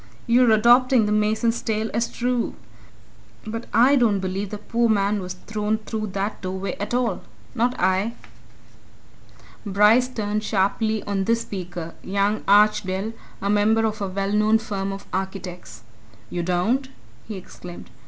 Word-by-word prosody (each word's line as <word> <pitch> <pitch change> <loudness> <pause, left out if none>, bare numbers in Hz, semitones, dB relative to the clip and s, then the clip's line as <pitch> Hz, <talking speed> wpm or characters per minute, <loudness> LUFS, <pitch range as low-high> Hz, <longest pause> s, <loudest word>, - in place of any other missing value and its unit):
"You're 240 +1 +4
adopting 240 +2 +5
the 210 - -1
mason's 215 +2 +1
tale 220 0 -2
as 230 +1 0
true. 245 -1 -1 0.9
But 225 +2 -5
I 255 +5 +5
don't 225 -6 +3
believe 190 +1 -3
the 210 - -5
poor 235 +3 0
man 205 -1 +2
was 180 0 -6
thrown 210 +3 -2
through 215 0 -4
that 200 +2 -3
doorway 190 +1 -4
at 205 +4 -2
all 245 -1 0 0.3
not 245 0 0
I!" 190 +5 +1 1.5
Bryce 210 +5 +4
turned 215 -4 -2
sharply 215 +2 0
on 195 -1 -1
this 230 +2 +2
speaker 175 -4 -6
young 200 +2 0
Archdale, 205 0 +3 0.3
a 200 - 0
member 220 +2 +3
of 215 -1 -2
a 200 - -1
well 195 +1 -2
known 215 +1 +4
firm 195 -3 -3
of 195 0 -7
architects. 180 - -5 0.5
"You 175 - -2
don't?" 185 +10 0 0.4
he 215 - -5
exclaimed. 180 -1 -10
210 Hz, 145 wpm, -23 LUFS, 195-225 Hz, 1.5 s, adopting